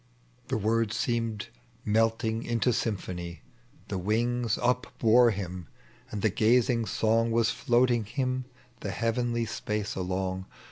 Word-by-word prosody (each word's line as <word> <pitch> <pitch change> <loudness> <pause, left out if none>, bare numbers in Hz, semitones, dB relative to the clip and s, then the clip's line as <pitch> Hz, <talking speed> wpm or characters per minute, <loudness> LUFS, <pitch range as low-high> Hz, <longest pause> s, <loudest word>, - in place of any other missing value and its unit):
— 125 0 -34
The - - 0
words 115 +1 +1
seemed 115 -4 -1 0.4
melting 115 +1 +1
into 120 0 +1
symphony. 90 - -3 0.4
The 95 - -3
wings 115 +4 0
upbore 125 -1 +3
him, 90 -4 -5 0.4
and 105 - -5
the 110 - +3
gazing 115 +2 +3
song 115 +3 +2
Was 115 0 +2
floating 120 -3 +2
Tiim 130 +2 -2 0.3
the 100 - -4
heavenly 115 +3 0
spaee 105 -1 -3
along. 95 0 -2
115 Hz, 125 wpm, -28 LUFS, 105-120 Hz, 0.4 s, upbore